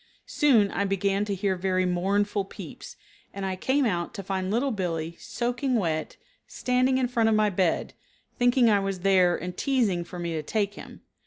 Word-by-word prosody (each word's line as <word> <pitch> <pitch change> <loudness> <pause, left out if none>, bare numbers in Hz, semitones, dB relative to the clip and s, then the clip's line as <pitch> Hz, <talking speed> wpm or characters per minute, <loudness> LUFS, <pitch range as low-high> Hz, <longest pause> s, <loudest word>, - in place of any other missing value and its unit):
Soon 235 -10 +3
I 200 - -1
began 195 +1 0
to 205 -1 -2
hear 195 0 0
very 185 0 0
mournful 200 +3 0
peeps, - - -10 0.4
and 195 -1 -4
I 190 -1 -2
came 265 +8 +1
out 175 -2 -2
to 200 - -5
find 190 0 -2
Little 245 +6 +1
Billee, 170 -5 -3
soaking 245 +2 -2
wet, 160 -7 -1 0.3
standing 255 +1 +1
in 255 -1 +1
front 230 -2 +2
of 220 - +3
my 215 -1 +3
bed, 180 -3 0 0.5
thinking 245 0 +4
I 210 -2 +4
was 195 -2 -3
there 185 -2 +4
and 180 0 -6
teasing 225 -11 +1
for 180 - -10
me 170 -1 -3
to 155 - -2
take 205 +5 -1
him. - - -11
200 Hz, 185 wpm, -26 LUFS, 185-235 Hz, 0.5 s, thinking